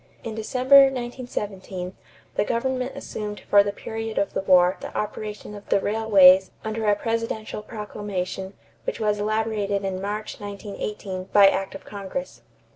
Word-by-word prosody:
In 225 - -5
December, 255 +5 +6
1917, 210 -8 -4 0.4
the - - +1
government 255 +3 -1
assumed 210 -1 -6
for 205 - +5
the 200 0 -1
period 225 +2 -5
of 200 - 0
the - - -1
war 180 -1 +5
the - - -7
operation 210 0 -5
of 205 -1 -11
the - - +4
railways 195 -3 +6 0.2
under 220 0 -2
a 205 - +5
presidential 225 -1 -3
proclamation 200 -3 -5 0.3
which - - -3
was 210 -1 +1
elaborated 210 -2 0
in 190 -1 -3
March, 210 +2 -4
1918, 200 -2 -5
by 200 +1 +6
act 195 0 0
of 195 - -10
Congress. 205 +7 -6
210 Hz, 145 wpm, -24 LUFS, 195-225 Hz, 0.4 s, December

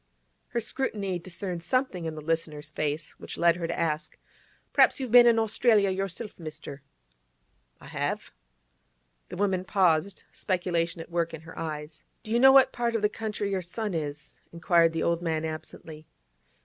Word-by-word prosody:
Her 240 - -2
scrutiny 210 -7 -2
discerned 175 0 -4
something 225 -5 -1
in 160 -1 -4
the 155 - -7
listener's 155 -2 -2
face 150 +1 -3
which - - -7
led 170 -1 +4
her 170 -1 -3
to - - -3
ask: 155 -1 -2 0.6
'Perhaps - - +5
you've 260 -4 -4
been 240 0 +9
in 230 -1 +5
Australia 220 -2 +3
yourself, 195 +3 -4
mister?' 155 -3 -8 1.0
'I - - -15
have.' - - -3 1.0
The 180 - -7
woman 190 -2 +1
paused, 185 -1 +1
speculation 170 -3 -1
at 165 - -11
work 170 -1 -1
in 160 - -11
her 165 +1 -12
eyes. 155 -1 -6 0.2
'Do 220 - -8
you 235 - +3
know 265 +2 +8
in - - +7
what 270 - +6
part 235 -1 -1
of 220 - -1
the 210 - +4
country 210 -2 -4
your 190 -1 0
son 205 +4 -4
is?' 150 -2 -5 0.2
inquired 170 0 +3
the 165 - -1
old 170 0 +1
man 160 -2 -1
absently. 155 0 -8
175 Hz, 175 wpm, -27 LUFS, 160-210 Hz, 1.0 s, been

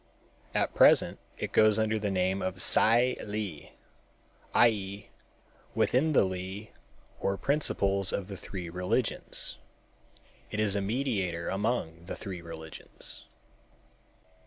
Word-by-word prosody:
At - - +1
present - - +5 0.2
it - - -4
goes 110 -1 +5
under 110 0 +1
the 105 -1 -1
name 95 0 0
of 95 0 -3
Tsai 120 +6 +4
Li, 105 -7 -5 0.8
i.e., 100 -3 +2 0.7
within 155 +5 +2
the - - +5
Li 95 +3 -5 0.5
or 100 0 -1
principles 100 -9 +1
of 95 - -3
the 100 - -7
three 90 -2 -7
religions. 90 +2 +1 0.9
It 105 - -4
is 105 -2 +1
a 100 - 0
mediator 100 -6 -1
among 95 -5 -2
the - - -5
three 95 -3 -7
religions. 80 -1 -8
100 Hz, 115 wpm, -29 LUFS, 90-110 Hz, 0.9 s, present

